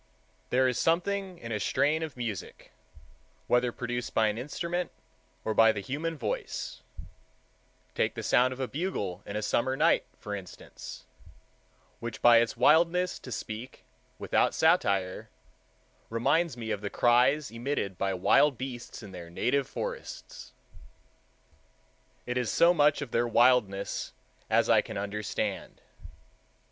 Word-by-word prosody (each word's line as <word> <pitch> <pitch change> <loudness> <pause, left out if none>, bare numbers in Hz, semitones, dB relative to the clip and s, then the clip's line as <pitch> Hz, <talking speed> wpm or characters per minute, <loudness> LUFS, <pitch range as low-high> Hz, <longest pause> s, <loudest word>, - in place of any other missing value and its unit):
There 130 +1 +3
is 125 - -1
something 185 +2 0
in 115 -7 -8
a 105 - -1
strain 155 +8 +1
of 155 -5 -5
music, 115 -6 -6 0.7
whether 125 0 +2
produced 120 0 -4
by 110 -1 +4
an 105 - -3
instrument 170 +6 -3 0.6
or 110 - 0
by 115 +1 +6
the 110 - -4
human 155 +9 -3
voice—take 110 -6 -6
the - - -5
sound 125 +1 +3
of 130 - -7
a 130 - -1
bugle 135 - -3
in 100 - -5
a 105 - -2
summer 130 +5 0
night, - - +3
for 105 - -6
instance,—which 100 +4 -11
by 120 -1 +7
its 115 0 +1
wildness, 170 +7 +3
to 125 - -10
speak 110 +2 -6 0.3
without - - +1
satire, 100 - +2 0.8
reminds 140 +6 +1
me 110 -2 -4
of 105 -2 -2
the 100 - -3
cries 125 +5 +3
emitted 115 -5 -3
by 100 - 0
wild 115 +9 +3
beasts 125 -2 -7
in 100 - -10
their 85 -2 -9
native 130 +10 0
forests. - - -7 1.7
It 125 0 -1
is 120 -3 -1
so 170 +1 +5
much 150 -2 +3
of 130 - -10
their 120 +1 +1
wildness 115 -5 +2 0.4
as - - +3
I - - +5
can - - -7
understand. 105 +1 -3
120 Hz, 135 wpm, -29 LUFS, 110-145 Hz, 1.7 s, by